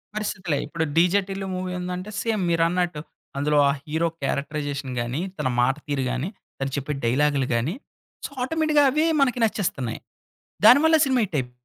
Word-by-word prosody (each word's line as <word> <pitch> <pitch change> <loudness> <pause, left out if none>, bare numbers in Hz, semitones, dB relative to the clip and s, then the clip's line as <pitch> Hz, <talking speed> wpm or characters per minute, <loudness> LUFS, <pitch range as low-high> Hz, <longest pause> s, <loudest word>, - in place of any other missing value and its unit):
పరిస్థితులే. 185 -7 -2
ఇప్పుడు 160 +2 -2
'DJ 180 +4 +4
Tillu' 195 0 -4
movie 185 0 -3
ఉందంటే, 180 +2 -5
సేమ్ 225 -3 -1
మీరన్నట్టు, 170 -1 +1 0.4
అందులో 150 +1 +1
ఆ - - +4
హీరో 160 +2 0 0.2
క్యారెక్టరైజేషన్ 140 -1 -3
గాని, 120 +6 -2 0.2
తన - - -1
మాట 130 +2 +2
తీరు 145 -2 -1
గాని, 130 +7 -2 0.3
తను 135 0 -2
చెప్పే 145 +2 -2
డైలాగులు 140 +2 +2
గాని 130 - -1 0.5
సో - - -6
ఆటోమేటిక్‍గా 310 +2 +2
అవే 305 +4 +2 0.2
మనకి 250 -3 +2
నచ్చేస్తున్నాయి. 170 - -1 0.7
దాని 245 +5 +9
వల్ల 320 0 +6
సినిమా 260 -2 +2
హిట్ 175 - -8
అయిప్ 125 -1 -5
165 Hz, 160 wpm, -24 LUFS, 140-200 Hz, 0.7 s, దాని